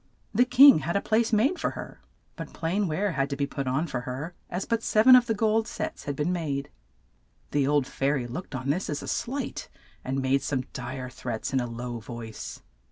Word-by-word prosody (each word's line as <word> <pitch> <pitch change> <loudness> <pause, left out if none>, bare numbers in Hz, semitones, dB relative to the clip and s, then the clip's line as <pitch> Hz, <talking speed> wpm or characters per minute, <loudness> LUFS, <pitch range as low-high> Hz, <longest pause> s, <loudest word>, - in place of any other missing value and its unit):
The 245 +4 +4
king 260 - +8
had 165 +5 -3
a - - +4
place 225 +3 +1
made 240 - +2
for - - 0
her, - - -8 0.3
but - - -8
plain 185 +5 -1
ware 190 +6 0
had 140 -3 -1
to 140 - -2
be 140 0 0
put 140 -1 -4
on 135 +6 +1
for 130 -6 -3
her, 130 +7 -5 0.2
as 180 +2 -3
but 230 -1 0
sev 215 -1 +2
en 260 0 +10
of 245 -1 +5
the 225 - +1
gold 220 +1 +2
sets - - -5
had 145 - -2
been 150 +6 0
made. 145 -5 -3 0.8
The 140 -2 +2
old 145 -2 +3
fai 135 +2 -1
ry 130 -4 -1
looked 130 +5 -6
on 130 +2 -1
this 180 +6 -2
as 145 - -3
a - - -7
slight, 270 +4 -3 0.3
and 135 +1 -2
made 135 +1 +2
some 130 -3 -1
dire 130 0 -5
threats 120 0 -4
in 135 - +3
a 120 - -2
low 120 0 -5
voice. 115 0 -8
145 Hz, 225 wpm, -27 LUFS, 130-210 Hz, 0.8 s, en